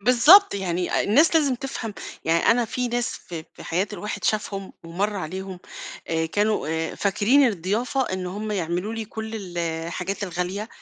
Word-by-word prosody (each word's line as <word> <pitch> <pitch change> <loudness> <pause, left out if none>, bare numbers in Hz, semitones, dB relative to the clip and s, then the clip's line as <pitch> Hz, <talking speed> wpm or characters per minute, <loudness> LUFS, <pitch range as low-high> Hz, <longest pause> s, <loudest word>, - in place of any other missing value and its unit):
بالضبط، 255 - +7
يعني 180 -2 -1
الناس 300 +11 +4
لازم 285 -5 +3
تفهم، 240 -4 -5 0.3
يعني 165 +1 +2
أنا 240 +1 +3
في 250 +2 -2
ناس 240 0 -1
ف 175 - -10 0.2
في - - -11
حياة 180 +4 0
الواحد 210 +1 -5
شافهم، 200 -2 -1
ومَرّ 195 +5 -2
عليهم، 190 +2 -5 0.5
آآ، 160 0 0
كانوا 205 +2 0
آآ، 160 0 -2
فاكرين 220 +8 +3
الضيافة 220 +6 0
إن 185 -6 -3
هم 210 +4 -4
يعملوا 180 +3 -2
لي 225 -1 -3
كل 220 +1 -6
ال 185 -5 -6
الحاجات 170 +4 -3
الغالية، 185 +3 -3
200 Hz, 160 wpm, -24 LUFS, 180-225 Hz, 0.5 s, بالضبط